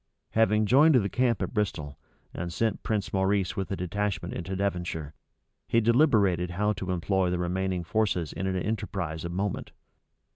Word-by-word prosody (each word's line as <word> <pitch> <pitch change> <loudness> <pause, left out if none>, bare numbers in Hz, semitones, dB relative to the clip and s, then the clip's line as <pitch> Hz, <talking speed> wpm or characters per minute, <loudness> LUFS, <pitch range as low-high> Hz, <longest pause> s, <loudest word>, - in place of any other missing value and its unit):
Having 110 -1 +3
joined 140 +7 +6
the 100 -5 +3
camp 120 +1 +1
at - - -4
Bristol, 80 -10 -2 0.3
and 85 0 -4
sent 110 +3 -1
Prince 105 -3 -2
Maurice 95 0 +1
with 95 - -3
a 95 - -1
detachment 90 -1 -2
into 90 +2 -4
Devonshire, 90 -6 -2 0.5
he 115 - +3
deliberated 110 - +3
how 105 +4 0
to 95 -2 -6
employ 90 +1 +1
the 90 - 0
remaining 90 +1 -1
forces 90 -4 0
in 95 - -3
an 95 - -1
enterprise 95 -5 -3
of 85 - -4
moment. 95 +2 -3
95 Hz, 160 wpm, -28 LUFS, 90-105 Hz, 0.5 s, joined